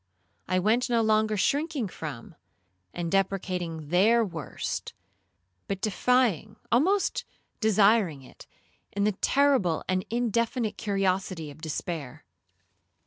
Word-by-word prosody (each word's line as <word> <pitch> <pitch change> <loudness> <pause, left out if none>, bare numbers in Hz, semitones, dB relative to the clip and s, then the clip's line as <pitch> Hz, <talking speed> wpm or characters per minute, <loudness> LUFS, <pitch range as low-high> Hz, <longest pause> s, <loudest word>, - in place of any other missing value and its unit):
I 185 - +1
went 225 +7 +2
no 230 -1 +2
longer 215 0 +2
shrinking 285 - 0
from, 150 -7 -8 0.6
and 170 -1 -4
deprecating 180 -5 -1
their 220 +7 +4
worst, 165 -7 -5 0.7
but 195 -1 -3
defying, 215 - +1 0.2
almost 365 - +2 0.4
desiring 205 -8 +3
it, - - -15 0.4
in 200 - -1
the 210 - +3
terrible 255 - +2
and 185 0 0
indefinite 235 -1 0
curiosity 190 -5 -1
of 145 - -15
despair. 155 -4 -5
200 Hz, 105 wpm, -27 LUFS, 175-230 Hz, 0.7 s, their